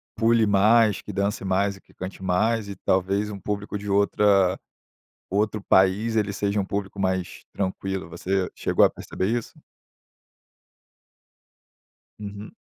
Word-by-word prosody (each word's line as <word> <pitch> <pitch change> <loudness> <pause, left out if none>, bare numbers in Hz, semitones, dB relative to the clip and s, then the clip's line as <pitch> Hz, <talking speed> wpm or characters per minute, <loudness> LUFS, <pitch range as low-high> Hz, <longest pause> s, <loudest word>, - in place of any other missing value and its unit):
pule 115 0 +3
mais, 105 +1 +4
que - - -8
dance 100 +1 -1
mais 100 +1 +1
e - - -19
que - - -25
cante 95 0 -8
mais, 105 +4 +1
e 100 - -6
talvez 95 +3 0
um 100 - -7
público 105 +1 -4
de 105 0 -7
outra 100 -2 +3 0.7
outro 105 +1 0
país 95 +5 +3
ele 105 -2 0
seja 100 +1 -1
um 100 - -1
público 100 0 -4
mais 95 -2 -2
tranquilo. 95 -2 -3
Você 90 +2 -1
chegou - - +2
a - - +4
perceber 95 - -4
isso? 120 - -8 2.6
Uhum. 105 0 -8
100 Hz, 135 wpm, -24 LUFS, 95-105 Hz, 2.6 s, mais